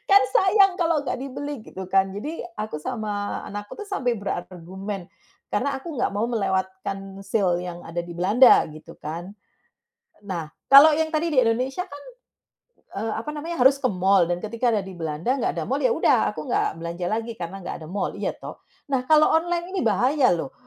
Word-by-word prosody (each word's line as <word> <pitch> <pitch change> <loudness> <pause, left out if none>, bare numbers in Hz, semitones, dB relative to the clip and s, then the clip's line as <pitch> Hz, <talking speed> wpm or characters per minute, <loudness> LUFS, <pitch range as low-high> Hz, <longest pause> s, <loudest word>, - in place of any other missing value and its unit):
Kan 400 0 +8
sayang 390 -2 +5
kalau 330 -2 +2
enggak - - -2
dibeli," 275 0 -5
gitu 190 0 -8
kan. 195 0 +4
Jadi 290 +12 -5 0.2
aku 215 -6 -3
sama 210 -4 -3
anakku 205 0 -7
sampai 255 - -1
berargumen 190 0 -6 0.4
karena 270 +6 0
aku 325 +4 -8
enggak 255 - +1
mau 205 +3 0
melewatkan 195 -2 -3
sale 185 -4 +1
yang 175 -1 -6
ada 170 +1 -3
di 175 - -8
Belanda, 210 +9 +6
gitu 155 0 -12
kan. 170 +5 -6 0.9
Nah, 170 -6 -4 0.2
kalau 285 +3 +9
yang 320 0 +1
tadi 325 +2 +1
di 265 - +5
Indonesia 250 +6 0
kan, 285 -1 -10 0.9
eee, 220 +2 -2
apa 230 - -6
namanya, 330 +2 -5
harus 270 +1 +7
ke 255 - +3
mall. 190 0 +4
Dan 175 - -1
ketika 230 +3 0
ada 215 - +2
di 190 -2 -9
Belanda 165 - -2
enggak 270 - -1
ada - - -2
mall, - - -1
ya - - +4
udah - - +3
aku - - -7
enggak 240 -9 0
belanja 170 +1 -4
lagi, 225 +1 -2
karena 180 0 -6
enggak - - -5
ada 155 - -9
mall, 200 - -2
iya - - -2
toh. - - -10 0.3
Nah, 255 - +1
kalau 310 0 +6
online 345 +2 0
ini - - 0
bahaya 250 +6 +3
loh. 260 +11 -5
215 Hz, 185 wpm, -24 LUFS, 190-275 Hz, 0.9 s, kalau